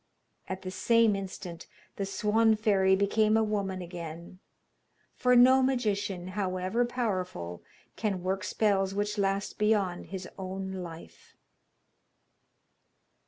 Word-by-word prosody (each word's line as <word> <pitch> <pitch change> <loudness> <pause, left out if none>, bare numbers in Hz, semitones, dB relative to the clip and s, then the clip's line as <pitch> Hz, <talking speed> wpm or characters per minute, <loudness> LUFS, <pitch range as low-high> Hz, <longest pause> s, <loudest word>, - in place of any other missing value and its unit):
At 190 0 -5
the 185 - -5
same 230 +1 +3
instant 185 -3 -7 0.3
the 195 - -2
Swan 220 +3 +3
fairy 195 -3 +3
became 215 +2 +2
a 225 - +3
woman 200 -3 -2
again, 170 0 -8 0.7
for 250 0 +3
no 260 +2 +7
magician, 205 -8 -1
however 185 +4 -1
powerful, 185 - -3 0.3
can 195 -5 -2
work 190 +1 -1
spells 195 -3 +1
which 205 +1 -1
last 195 +1 -1
beyond 205 -4 +1
his 190 -2 -6
own 190 0 -5
life. 170 -3 -9
195 Hz, 115 wpm, -29 LUFS, 185-215 Hz, 0.7 s, no